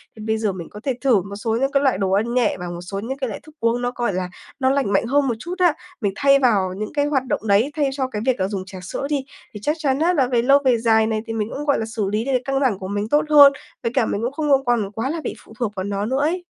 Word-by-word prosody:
Thì 215 - -11
bây 220 0 0
giờ 215 -2 0
mình 175 -3 -8
có 210 - -10
thể 265 - 0
thử 245 -8 +3
một 200 +2 -8
số 225 +2 -1
những 270 +1 +1
cái 280 0 +2
loại 260 -8 +2
đồ 190 -1 -1
ăn 220 +5 +1
nhẹ 245 -6 +1
và 180 - -5
một 175 0 -6
số 195 +2 -5
những 260 +6 -4
cái 265 - -2
loại 215 - -6
thức 310 0 -17
uống 230 +1 +1
nó, 245 - -1
gọi 240 -5 -1
là, 180 0 -2 0.3
nó 260 0 +2
lành 270 -7 +1
mạnh 195 - +2
hơn 275 +3 +2
một 235 - 0
chút 350 +8 -5
á. 350 -4 +4 0.3
Mình 200 -3 0
thay 275 -1 +4
vào 200 -8 +2
những 215 +5 -5
cái 290 -1 +1
hoạt 275 -3 +1
động 220 - -2
đấy, 215 +8 +3
thay 290 -3 +1
cho 265 -2 -1
cái 210 -5 -5
việc 260 -1 +1
là 185 - +1
dùng 195 -2 -4
trà 190 -1 -9
sữa 230 +9 -4
đi 280 -3 -1 0.3
thì 210 - -7
chắc 300 - +1
chắn 275 -3 0
á, 345 +3 +3
là 270 -7 +2
về 245 -2 +2
lâu 275 +4 +5
về 250 -2 +4
dài 220 -1 +3
này, 215 -1 -1
thì 225 - -3
mình 220 0 -2
cũng, 295 - -5
gọi 285 -2 +2
là, 220 - -2
xử 220 -3 -3
lý 215 +3 -1
được 275 - -1
căng 270 0 0
thẳng 230 -8 +1
của 185 - -6
mình 205 +2 -3
tốt 295 +1 +3
hơn. 285 -2 +8 0.3
Với 230 - -1
cả 250 -4 +3
mình 205 - -2
cũng 245 +3 -1
không 300 0 -2
có 270 -1 +4
còn 230 -5 +1
quá 225 +6 -3
là 325 0 -3
bị - - -4
phụ - - -15
thuộc 225 -4 -1
vào 185 - -3
nó 200 +1 -2
nữa 260 +4 0
ấy. 350 +4 0
235 Hz, 325 wpm, -21 LUFS, 205-275 Hz, 0.3 s, hơn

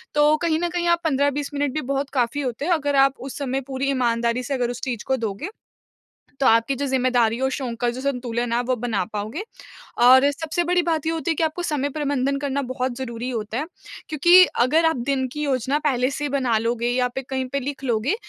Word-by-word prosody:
तो 295 +1 +5
कहीं 320 -1 0
न 350 0 -1
कहीं 345 0 -1
15-20 285 -1 0
मिनट 285 -2 -1
भी 310 - -1
बहुत 275 +1 -2
काफ़ी 255 +2 0
होते 255 +1 -3
हैं 360 - 0
अगर 290 -4 +1
आप 275 0 +5
उस 265 +1 -7
समय 270 -1 -2
पूरी 270 0 -2
ईमानदारी 235 -1 0
से 275 - -3
अगर 245 -3 0
उस 245 0 -6
चीज़ 240 -5 -3
को 265 - +1
दोगे 225 - -4 0.9
तो 275 - +1
आपकी 230 +4 +3
जो 280 - -2
ज़िम्मेदारी 245 -3 +2
और 265 - +2
शौक 260 -4 -3
का 240 - +2
जो 255 - -5
संतुलन 245 -3 -2
है - - +2
आप 245 - -2
वो 255 - +2
बना 230 -5 -1
पाओगे। 215 - -4 0.6
और 260 +3 +7
सबसे 320 +4 -2
बड़ी 355 +1 +2
बात 320 -3 -1
ये 325 - +1
होती 325 -1 -2
है - - +2
कि 325 - -2
आपको 320 +3 -2
समय 295 -5 -1
प्रबंधन 280 -2 -1
करना 280 0 -2
बहुत 255 -1 -3
ज़रूरी 240 -1 -5
होता 225 -1 -3
है। 300 - -2 0.4
क्योंकि 345 +4 +7 0.2
अगर 310 +6 +3
आप 320 - +2
दिन 270 -2 +1
की 300 - -4
योजना 270 0 0
पहले 255 -3 +2
से 295 +1 -4
ही - - 0
बना 260 -5 +1
लोगे 235 +1 -1
या 250 +1 +1
फिर 265 - -4
कहीं 260 -1 -1
पे 280 - 0
लिख 275 +1 -5
लोगे, 240 - +1
270 Hz, 230 wpm, -23 LUFS, 245-290 Hz, 0.9 s, और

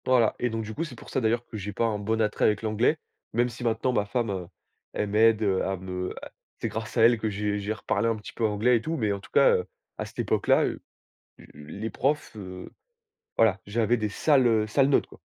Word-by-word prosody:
Voilà 125 -3 +4
et 125 - 0
donc, 115 0 -3
du 110 +1 -6
coup, 165 - -2
c'est 145 -7 -7
pour - - -13
ça 130 - 0
d'ailleurs 120 +1 +1
que 110 - -8
j'ai 105 0 -5
pas 115 - 0
un 110 -2 -1
bon 110 +2 0
attrait 105 -1 +1
avec 105 0 +2
l'anglais, 110 +8 +2 0.4
même 120 +2 +2
si 120 +1 -9
maintenant 115 +2 0
ma 105 -3 +1
femme, 115 0 -1
heu, 90 -3 -4 0.5
elle 105 - -2
m'aide, 110 +1 +4
heu, 95 -2 +1
à 95 0 -2
me 90 0 -4 0.5
c'est - - -2
grâce 110 +1 -5
à 115 - +5
elle 115 0 +5
que 110 - -1
j'ai 105 0 -2
j'ai 100 +2 -2
reparlé 115 +1 -1
un 115 - +1
petit 105 - -10
peu 115 - -1
anglais 110 +4 +3
et - - -4
tout, 160 +4 -3
mais 110 -4 0
en 100 - -4
tout 100 - -15
cas, - - +6
heu, - - -3 0.3
à - - -2
cette - - -14
époque - - 0
là, - - +5
l - - -2 0.8
les 90 +10 -6
profs, 140 +4 -1
heu, 95 -3 -8 0.7
voilà, 110 -4 +4
j'avais 115 +3 +1
des 110 -2 -2
sales, 135 +4 +3
heu, 110 -2 +3
sales 135 +5 +3
notes, - - +3
quoi. - - -16
110 Hz, 245 wpm, -27 LUFS, 105-120 Hz, 0.8 s, cas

